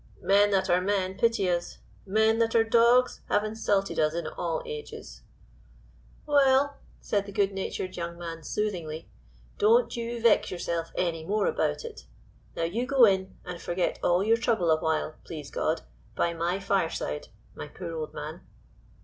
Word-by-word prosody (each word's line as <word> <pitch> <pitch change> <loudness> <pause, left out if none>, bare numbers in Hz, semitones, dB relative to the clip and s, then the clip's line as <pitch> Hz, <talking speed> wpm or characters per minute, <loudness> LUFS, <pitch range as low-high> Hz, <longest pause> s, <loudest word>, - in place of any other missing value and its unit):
Men 205 +1 +5
that 190 -1 +1
are 180 0 +3
men 190 -1 0
pity 230 -3 +2
us; 175 -1 -1 0.3
men 220 +3 +3
that 225 0 +1
are 225 - +6
dogs 235 +2 +4
have 205 - +2
insulted 210 -2 -1
us 155 +1 +2
in 170 - -3
all - - -3
ages." 460 -1 -8 1.0
"Well," 280 -1 +3 0.2
said 200 -1 -1
the - - -7
good 200 0 +1
natured 190 -1 -4
young 170 -1 -5
man 165 -1 -6
soothingly 170 -4 -4 0.5
"don't 455 +4 +4
you 235 0 -4
vex 230 -2 +4
yourself 170 -2 -3
any 165 -3 -1
more 205 +4 0
about - - 0
it. 460 -1 -10 0.5
Now - - -2
you 220 +10 -1
go 270 -3 +6
in, 190 -2 0
and 180 -2 -7
forget 175 +1 -1
all 175 +2 +2
your 225 +2 +3
trouble 220 -8 +1
awhile, 155 0 0
please 150 -4 -8
God, - - -1 0.3
by 170 - +1
my 170 +3 -1
fireside, 175 - -1 0.3
my - - -7
poor 165 - -7
old 155 -2 -4
man." - - -7
195 Hz, 160 wpm, -27 LUFS, 170-230 Hz, 1.0 s, are